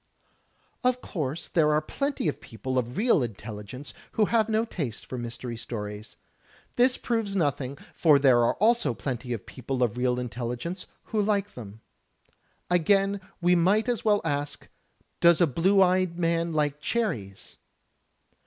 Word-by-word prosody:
Of 250 0 +2
course 155 - -4
there 155 -3 +3
are 150 - +4
plenty 275 - -2
of 150 - -2
people 130 +3 -3
of 125 +1 -4
real 225 - +3
intelligence 110 +3 -6 0.2
who 215 - +3
have 225 0 +2
no 220 +1 +2
taste 140 - -5
for - - -6
Mystery 120 0 -5
Stories. 105 -2 -7 0.6
This 250 +1 +4
proves 225 -4 -1
nothing, 140 -5 -1 0.2
for 155 -4 +5
there 130 -4 +5
are 115 - +2
also 225 - +2
plenty 125 -1 -4
of 115 -4 -4
people 130 0 -3
of 120 0 0
real 125 0 +1
intelligence 125 - -4 0.2
who 215 -2 -1
like 205 -1 0
them. 110 -2 -10 0.9
Again 195 +3 +2 0.2
we 175 +1 +4
might 195 +6 +3
as 240 -3 -1
well 210 -2 +3
ask, 145 -1 -3 0.5
"Does 170 -2 +6
a 175 - +6
blue 190 +7 +4
eyed 185 -1 +1
man 170 -1 +1
like 150 -2 0
cherries? 125 - -3
155 Hz, 150 wpm, -27 LUFS, 125-200 Hz, 0.9 s, Does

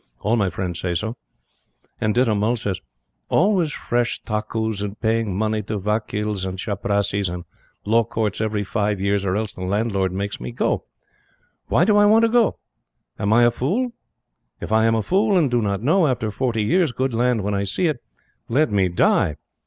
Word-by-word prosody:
"All 110 +3 +1
my 100 -5 +1
friends 90 -1 -4
say 90 -1 -2
so. 110 +6 -2 0.8
And 110 -1 0
Ditta 120 -3 +3
Mull 105 +4 +1
says: 105 -6 -3 0.5
'Always 180 -4 +2
fresh 120 -3 -1
takkus 110 -1 -2
and 105 0 -5
paying 110 -4 0
money 110 0 0
to 105 +1 -4
vakils 105 0 -2
and 95 0 -4
chaprassis 100 -1 -1
and 90 0 -6 0.4
law 115 +2 +3
courts 110 -2 -2
every 110 -1 -1
five 100 0 -1
years 100 0 0
or 95 -1 0
else 110 0 -2
the - - -10
landlord 100 0 0
makes 100 +2 -4
me 60 0 -5
go. - - -1 0.8
Why 175 - +3
do 210 0 +4
I 205 - +6
want 220 +2 +5
to - - +1
go? 235 -1 +3 0.6
Am 100 - 0
I 120 +2 +6
fool? 210 - -1 0.7
If - - -6
I 110 0 +4
am 115 - +3
a 110 - 0
fool 200 - +2
and 150 -7 +2
do 120 -1 +2
not 100 0 -1
know, 165 +5 +3
after 120 -5 -1
forty 115 -1 -1
years, 165 - +2
good 130 +1 -2
land 120 -2 +1
when 105 +1 -1
I 100 0 0
see 100 - -1
it, 155 -7 0 0.5
let 145 +2 +2
me 95 -3 +2
die! 80 -3 +2
110 Hz, 190 wpm, -22 LUFS, 100-120 Hz, 0.8 s, I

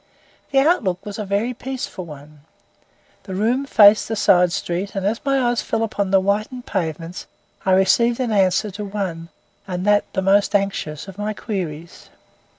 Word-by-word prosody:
The 275 - -1
outlook 270 - +2
was 205 +1 -6
a 210 - -3
very 205 +5 -1
peaceful 255 -7 -6
one. 150 -1 -12 0.8
This 190 -2 -6
room 245 +7 0
faced 210 -4 +6
a 225 - -1
side 180 -4 +4
street, 180 +4 -3
and, 195 -1 -2
as 220 +3 -1
my 275 -1 +1
eyes 240 -2 +1
fell 225 - -1
upon 205 -3 -2
the 195 0 +4
whitened 215 +6 -2
pavements, 165 +1 -4 0.4
I 190 - +4
received 230 +6 +3
an 250 -3 -1
answer 195 0 +2
to 205 +3 -6
one, 190 -5 -4 0.4
and 180 0 -3
that 205 0 +2
the 190 - -1
most 200 +2 +3
anxious, 195 -6 -2
of 195 +1 -11
my 210 +1 -2
queries. 170 -7 -6
200 Hz, 170 wpm, -21 LUFS, 185-220 Hz, 0.8 s, faced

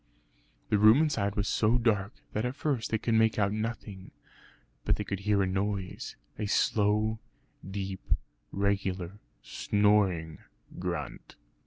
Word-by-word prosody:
The 105 - +3
room 110 +4 +8
inside 120 -11 +1
was 100 0 0
so 110 +3 +3
dark, 110 -3 +1 0.2
that 105 - -1
at 125 +1 -2
first 140 -6 -1
they 110 - +1
could 115 +1 -1
make 110 0 +3
out 100 -1 +2
nothing; 110 -3 -5 0.7
but - - +2
they - - -3
could 100 - -4
hear 100 0 +2
a - - +2
noise 95 0 -3 0.2
a 105 - -1
slow 105 +2 +2 0.5
deep 95 -1 -4 0.5
regular 100 -1 -1 0.2
snoring 100 -7 +1 0.4
grunt. - - -5
105 Hz, 135 wpm, -29 LUFS, 100-110 Hz, 0.7 s, room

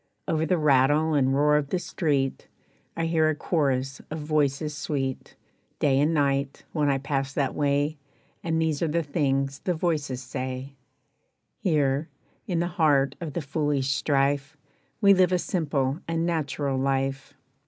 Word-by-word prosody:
Over 160 0 0
the 180 - +2
rattle 150 +1 +3
and 135 -2 +2
roar 150 +1 +4
of 145 -2 -2
the 185 - 0
street 145 -6 -1 0.5
I 165 - 0
hear 160 -1 +2
a 155 - 0
chorus 135 -4 -1
of 155 - -4
voices 150 -1 0
sweet, 135 -3 -3 0.4
Day 135 -2 +2
and 150 +3 +3
night, 140 -3 0
when 150 -3 +1
I 135 - +2
pass 135 0 -2
that 140 -2 0
way, 145 +1 0 0.4
And 160 -1 0
these 160 -3 0
are 165 - +2
the 165 +2 0
things 140 -2 0
the 180 - -1
voices 150 -6 -1
say: 130 +1 -5 0.9
"Here, 145 -3 +1 0.4
in 180 - -1
the - - +1 0.2
heart 140 -3 +4
of 160 -4 -5
the 170 - -2
foolish 140 -1 0
strife, 140 +1 0 0.4
We 200 -1 +7
live 185 -1 +4
a 180 - +3
simple 150 -6 -1
and 165 0 0
natural 145 -5 -1
life. 135 +1 -1
145 Hz, 155 wpm, -26 LUFS, 135-160 Hz, 0.9 s, We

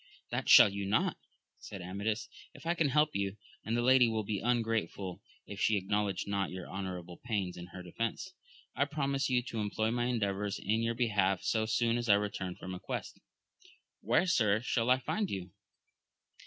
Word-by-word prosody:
That - - -2
shall - - +10
you 100 0 -4
not, 100 - +1 0.4
said 100 -3 -8
Amadis, 100 +4 -2 0.3
if - - -13
I 170 - +2
can 165 -4 +1
help 150 +2 +2
you, 100 0 -1 0.3
and 115 +2 -1
the 120 - +1
lady 130 -1 +6
will 110 -1 -1
be 105 -1 -2
ungrateful 115 -6 -1 0.2
if 100 - -8
she 110 - +3
ac 95 - -4
knowledge 105 -1 0
not 100 -1 -1
your 90 -1 -7
honourable 90 -2 -6
pains 100 -7 -2
in 90 0 -8
her 90 0 -9
defence. 115 - -4 0.4
I 140 - +2
promise 140 -2 -1
you 125 -1 +2
to 115 -2 -5
employ 110 +1 0
my 120 0 0
endeavours 105 -4 -1
in 110 +3 0
your 115 0 0
be 120 0 +1
half, 95 -3 +1
so. 110 -1 +1
soon 115 +1 +1
as 120 -1 -4
I 100 - +8
return 100 -3 -2
from 95 - -7
a 90 - -6
quest. - - -5 0.5
— - - -27
^Where, 120 - +3
sir, 110 - +3
shall 120 -1 0
I 130 - +6
find 200 - -2
you 95 -2 -5
110 Hz, 195 wpm, -32 LUFS, 100-120 Hz, 0.5 s, shall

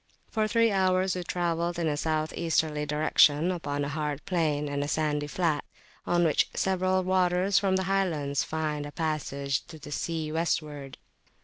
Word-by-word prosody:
For 215 -1 +1
three 230 0 +3
hours 185 -1 +2
we 180 - -3
travelled 170 -1 -1
in 170 -2 0
a 150 - +1
south 155 +1 -1
easterly 155 -3 0
direction 150 +2 +4
upon 145 -5 -2
a - - -3
hard 150 -1 -3
plain 155 -5 0
and 145 0 -2
a - - -3
sandy 150 -1 0
flat, 160 -2 0 0.4
on 175 0 +3
which 160 -3 +2
several 185 0 +1
waters 185 +1 +2
from 195 -2 +1
the 190 - +1
highlands 170 -8 0
find 150 -2 -3
a - - -9
passage 140 -4 -2
to 160 - -10
the 145 -1 -11
sea 160 0 -2
westward. 150 -4 -2
160 Hz, 170 wpm, -28 LUFS, 150-185 Hz, 0.4 s, direction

